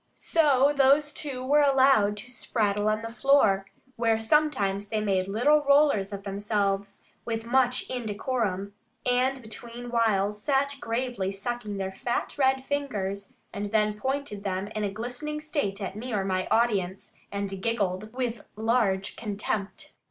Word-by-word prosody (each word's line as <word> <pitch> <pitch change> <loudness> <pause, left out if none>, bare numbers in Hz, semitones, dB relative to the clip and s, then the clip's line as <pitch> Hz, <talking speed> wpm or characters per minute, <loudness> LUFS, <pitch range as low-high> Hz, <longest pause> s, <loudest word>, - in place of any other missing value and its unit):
So 285 -3 +3
those 280 +2 +4
two 265 -4 -4
were 295 +3 +4
allowed 265 -7 +4
to 245 +5 -7
spraddle 210 -3 0
on 215 +1 -2
the 230 - -5
floor, 215 -6 +3 0.3
where 225 -1 +2
sometimes 220 -6 +1
they 215 +1 -1
made 195 -3 0
little 265 +9 +3
rollers 280 -9 +3
of 200 -1 -6
themselves, 200 0 -1 0.2
with 225 -1 -3
much 250 +1 +2
indecorum, 215 -4 -2 0.3
and 255 +2 +2
between 235 +2 -8
whiles 210 -3 +1
sat 280 +2 +1
gravely 235 -4 -2
sucking 210 +1 -4
their 190 -1 -3
fat 240 +5 -3
red 265 -1 +2
fingers, 200 -9 -3 0.2
and 205 +1 -3
then 210 0 +2
pointed 260 -2 -3
them 195 0 -2
in 215 -1 -3
a 205 - 0
glistening 245 +9 -5
state 290 - -2
at 190 0 -4
me 245 +4 -6
or 200 -3 0
my 185 -1 -1
audience, 200 -5 0 0.2
and 200 -1 -4
giggled 210 -2 -1
with 245 -2 -2
a - - -18
large 220 -4 +1
contempt. 205 -2 -4
225 Hz, 150 wpm, -27 LUFS, 200-260 Hz, 0.3 s, those